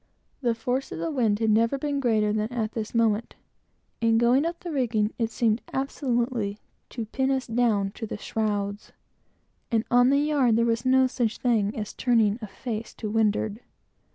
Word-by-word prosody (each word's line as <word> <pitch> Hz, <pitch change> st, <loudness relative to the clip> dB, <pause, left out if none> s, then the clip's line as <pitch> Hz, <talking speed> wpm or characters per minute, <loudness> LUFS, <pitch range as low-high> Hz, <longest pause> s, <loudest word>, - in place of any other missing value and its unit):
The 240 Hz, -3 st, +1 dB
force 250 Hz, +3 st, -2 dB
of -, -, -5 dB
the 330 Hz, -, -2 dB
wind 230 Hz, -7 st, +1 dB
had 220 Hz, 0 st, +1 dB
never 230 Hz, +5 st, +3 dB
been 285 Hz, 0 st, -2 dB
greater 215 Hz, -5 st, +2 dB
than 215 Hz, +2 st, -1 dB
at 225 Hz, -3 st, -2 dB
this 225 Hz, 0 st, -5 dB
moment. 225 Hz, -1 st, +1 dB, 0.7 s
In 225 Hz, -1 st, +3 dB
going 245 Hz, +6 st, +3 dB
up 340 Hz, 0 st, -5 dB
the 345 Hz, -, -5 dB
rigging, 230 Hz, -6 st, 0 dB
it 225 Hz, -1 st, +1 dB
seemed 225 Hz, 0 st, +1 dB
absolutely 240 Hz, -6 st, -1 dB, 0.3 s
to 230 Hz, -3 st, -5 dB
pin 265 Hz, +4 st, -1 dB
us 265 Hz, -1 st, 0 dB
down 225 Hz, -4 st, +1 dB
to 225 Hz, +2 st, -6 dB
the -, -, -5 dB
shrouds; 205 Hz, -1 st, -3 dB, 0.8 s
and 225 Hz, -2 st, +1 dB
on 245 Hz, +1 st, +5 dB
the 280 Hz, -, +4 dB
yard, 285 Hz, -6 st, +2 dB
there 230 Hz, +1 st, +3 dB
was 230 Hz, +2 st, 0 dB
no 260 Hz, 0 st, +5 dB
such 245 Hz, -3 st, -1 dB
thing 220 Hz, -4 st, +1 dB
as 210 Hz, -1 st, -4 dB
turning 225 Hz, -3 st, +2 dB
a 215 Hz, -, -5 dB
face 220 Hz, +2 st, -6 dB
to 215 Hz, -2 st, -5 dB
windward. 215 Hz, -1 st, +1 dB
230 Hz, 180 wpm, -26 LUFS, 215-255 Hz, 0.8 s, on